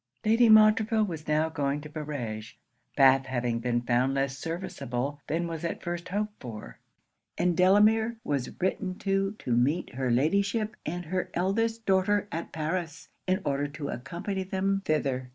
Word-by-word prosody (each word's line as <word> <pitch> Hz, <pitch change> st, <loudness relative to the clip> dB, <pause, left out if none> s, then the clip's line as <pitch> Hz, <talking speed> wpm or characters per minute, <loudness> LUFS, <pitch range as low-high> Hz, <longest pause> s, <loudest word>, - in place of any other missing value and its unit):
Lady 225 Hz, +2 st, +5 dB
Montreville 215 Hz, +1 st, +6 dB
was 165 Hz, -6 st, -5 dB
now 155 Hz, +1 st, +2 dB
going 145 Hz, -2 st, -1 dB
to 150 Hz, -, -8 dB
Barege, 140 Hz, -8 st, -6 dB, 0.4 s
Bath 135 Hz, -1 st, +5 dB
having 120 Hz, -2 st, -1 dB
been 120 Hz, 0 st, 0 dB
found 125 Hz, +3 st, +1 dB
less 135 Hz, -1 st, 0 dB
serviceable 145 Hz, -4 st, -4 dB
than 170 Hz, +3 st, -1 dB
was 165 Hz, -1 st, -5 dB
at 170 Hz, -, -3 dB
first 175 Hz, +1 st, -4 dB
hoped 210 Hz, +2 st, -2 dB
for; 115 Hz, -4 st, -9 dB, 0.6 s
and 175 Hz, -1 st, +2 dB
Delamere 215 Hz, +5 st, +4 dB
was 140 Hz, -4 st, -3 dB
written 185 Hz, 0 st, -1 dB
to 195 Hz, +1 st, 0 dB
to 125 Hz, -, -5 dB
meet 140 Hz, +9 st, +1 dB
her 130 Hz, 0 st, -1 dB
Ladyship 200 Hz, -, +1 dB
and 175 Hz, +3 st, -3 dB
her 185 Hz, +3 st, -2 dB
eldest 225 Hz, +5 st, 0 dB
daughter 195 Hz, +2 st, +2 dB
at 165 Hz, -, -4 dB
Paris, 165 Hz, +1 st, -3 dB, 0.2 s
in 185 Hz, +2 st, +1 dB
order 140 Hz, 0 st, 0 dB
to 145 Hz, 0 st, -6 dB
accompany 170 Hz, -, -4 dB
them 195 Hz, +1 st, -1 dB
thither. 135 Hz, -4 st, 0 dB
165 Hz, 155 wpm, -28 LUFS, 135-195 Hz, 0.6 s, Montreville